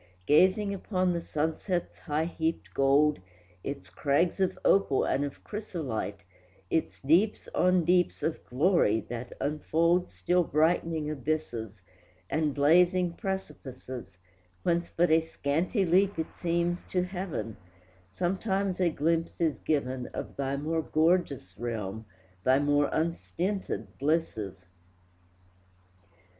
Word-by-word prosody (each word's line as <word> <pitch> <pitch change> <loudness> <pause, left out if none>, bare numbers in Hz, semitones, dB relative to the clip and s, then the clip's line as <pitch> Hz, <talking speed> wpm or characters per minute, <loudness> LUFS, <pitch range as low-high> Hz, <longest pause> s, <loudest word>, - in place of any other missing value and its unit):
Gazing 190 +6 +4
upon 185 -2 0
the 170 - -2
sunset's 160 +4 -2
high 155 0 -1
heaped 165 -1 -3
gold, 140 +2 +3 0.4
Its 140 0 -6
crags 155 +6 +1
of 190 -1 +1
opal 195 -9 +4
and 140 - +1
of 140 -1 -6
chrysolite, 160 - -4 0.5
Its 160 - 0
deeps 175 +10 +2
on 180 -2 +3
deeps 180 +1 +2
of 160 - -2
glory, 130 - +3
that 120 +1 -7
unfold 165 +4 +1
Still 180 0 +1
brightening 160 0 +1
abysses, 120 -9 -3 0.5
And 155 -2 0
blazing 175 +4 +4
precipices, 130 - -6 0.5
Whence 170 0 +1
but 175 0 +2
a 160 +1 +6
scanty 160 - 0
leap 190 +3 +3
it 160 - -4
seems 175 0 0
to 180 -1 +1
heaven, 180 - -4 0.5
Sometimes 190 - -1
a 175 - +4
glimpse 165 +1 0
is 160 -4 +1
given 130 -4 -1
Of - - -5
thy 140 0 -1
more 160 +3 -1
gorgeous 155 - +1
realm, 110 -2 -4 0.4
thy 130 +1 +5
more 145 0 +2
unstinted 165 - -2
blisses. 130 - -1
160 Hz, 115 wpm, -29 LUFS, 140-180 Hz, 0.5 s, a